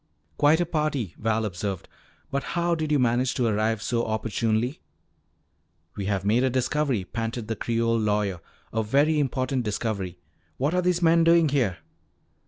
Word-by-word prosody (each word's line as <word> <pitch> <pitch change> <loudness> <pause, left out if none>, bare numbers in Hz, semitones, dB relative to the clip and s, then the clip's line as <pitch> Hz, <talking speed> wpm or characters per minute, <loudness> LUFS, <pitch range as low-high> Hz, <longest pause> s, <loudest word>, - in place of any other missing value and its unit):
"Quite 150 +3 +4
a 175 - +2
party," 150 - -1
Val 110 0 0
observed. 95 -1 -4 0.4
"But 140 - 0 0.2
how 170 0 +2
did 155 -2 -2
you 150 - +4
manage 125 0 +1
to 125 - +1
arrive 110 -1 0
so 120 -1 0
opportunely?" 110 - -1 1.1
"We 100 - -4
have 100 -2 -1
made 115 +5 +3
a 130 - +3
discovery," 130 -2 0
panted 115 0 -4
the 115 - -2
Creole 115 +1 0
lawyer; 105 -4 0 0.3
"a 110 - +1
very 145 +8 +2
important 130 -1 0
discovery. 100 -4 -3 0.4
What 145 +5 0
are 180 - +2
these 180 -1 +1
men 165 0 +5
doing 165 -1 +5
here?" 125 -10 +1
120 Hz, 160 wpm, -25 LUFS, 110-145 Hz, 1.1 s, men